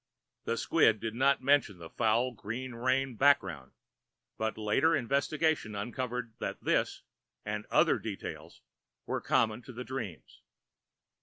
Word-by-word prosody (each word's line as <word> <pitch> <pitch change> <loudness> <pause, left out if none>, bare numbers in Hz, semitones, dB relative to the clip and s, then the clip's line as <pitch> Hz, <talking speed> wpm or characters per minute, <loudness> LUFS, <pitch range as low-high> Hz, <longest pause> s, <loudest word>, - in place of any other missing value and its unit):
The - - -1
squib 110 -1 +3
did 110 +1 -4
not 135 +2 +2
mention 140 -8 +3
the 85 -1 -11
foul 120 +2 +2
green 120 +4 -5
rain 130 +2 0
background, 95 - +2 0.6
but 110 0 -2
later 110 +10 +2
investigation 140 -2 0
uncovered 120 +2 -4
that - - -4
this - - 0 0.4
and 105 0 -4
other - - +4
details - - -7 0.4
were - - -2
common 110 0 +1
to 130 - -11
the 125 +2 -6
dreams. 110 - -7
120 Hz, 130 wpm, -31 LUFS, 105-130 Hz, 0.6 s, other